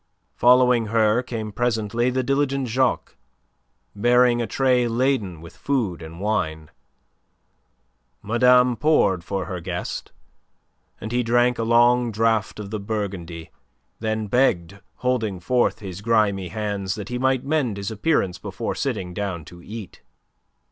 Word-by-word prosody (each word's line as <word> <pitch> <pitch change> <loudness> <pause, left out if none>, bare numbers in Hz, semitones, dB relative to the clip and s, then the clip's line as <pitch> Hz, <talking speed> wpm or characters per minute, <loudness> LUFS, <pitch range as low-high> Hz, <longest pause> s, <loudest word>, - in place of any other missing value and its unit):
Following 125 -1 +4
her 110 +1 +2
came 115 -4 -5
presently 115 +1 0
the 130 +1 -1
diligent 140 0 0
Jacques, 125 +2 0 0.8
bearing 120 +2 +3
a 115 - -2
tray 125 +1 +2
laden 115 - 0
with 85 +1 -12
food 115 -12 -2
and 80 +1 -9
wine. 80 -7 -2 1.5
Madame 125 +2 +4
poured 115 - +2
for 95 +1 -3
her 90 -2 -5
guest, 90 +1 -5 0.9
and 110 - -6
he 125 +1 +1
drank 120 +1 +2
a - - 0
long 120 +1 +4
draught 110 -4 0
of 100 -1 -7
the 110 - -3
Burgundy, 95 -6 -5 0.5
then 110 -1 -2
begged, 100 -5 +1 0.2
holding 115 -7 -1
forth 120 +5 +1
his 95 -1 -7
grimy 105 -4 +1
hands, 100 -2 -3
that 105 -3 -7
he 125 0 -3
might 130 -1 +1
mend 140 -8 0
his 100 +2 -4
appearance 105 - 0
before - - -4
sitting 90 -1 -3
down 90 -5 -4
to 85 +2 -13
eat. 105 +2 -9
110 Hz, 135 wpm, -23 LUFS, 95-125 Hz, 1.5 s, Following